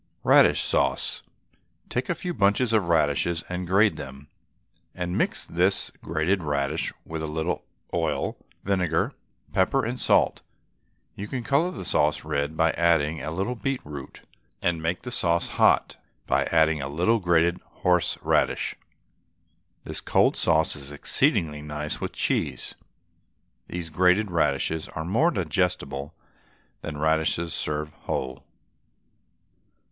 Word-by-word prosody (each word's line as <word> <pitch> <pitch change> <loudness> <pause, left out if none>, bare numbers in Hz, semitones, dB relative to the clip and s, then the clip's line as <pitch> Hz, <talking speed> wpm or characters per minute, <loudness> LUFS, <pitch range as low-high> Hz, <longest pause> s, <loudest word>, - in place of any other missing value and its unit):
RADISH - - +6
SAUCE. - - 0 0.7
Take 125 +1 -3
a 175 - +1
few 180 +1 -4
bunches 105 +2 +2
of 100 -6 +2
radishes 80 +1 +2
and 90 0 -3
grate 100 -1 +3
them, 70 0 -9 0.7
and 90 0 -3
mix - - 0
this 90 +4 +1
grated 85 +4 0
radish 70 -3 -1
with 80 -1 -5
a 80 - -3
little 80 +3 -2 0.3
oil, - - -1 0.3
vinegar, 95 -4 0 0.4
pepper, 110 +7 +2
and 125 +2 -3
salt. - - +3 0.7
You 100 - -6
can 125 +2 -4
colour 145 +8 +2
the 185 - -7
sauce - - +1
red 70 +2 -2
by 80 0 +4
adding 80 -2 +2
a 75 - -4
little 95 +9 -2
beetroot, 115 - -5 0.4
and 85 -2 0
make 85 +2 -2
the 125 - -6
sauce 85 -7 +1
hot - - +3 0.3
by - - +2
adding 80 -2 +3
a 70 - -4
little 90 +10 +2
grated 85 -1 +2
horse 90 -2 0
radish. - - +1 1.1
This - - -5
cold - - +3
sauce 80 -1 +2
is 70 -1 -8
exceedingly 75 +1 +1
nice 75 0 -4
with - - -3
cheese. - - -1 0.9
These 85 -2 -5
grated 90 +5 +3
radishes 80 0 0
are 80 - -6
more 115 - +3
digestible 85 - -1 0.7
than 75 -2 -5
radishes 80 +2 +1
served 75 -1 -2
whole. 65 0 -3
85 Hz, 130 wpm, -26 LUFS, 75-95 Hz, 1.1 s, RADISH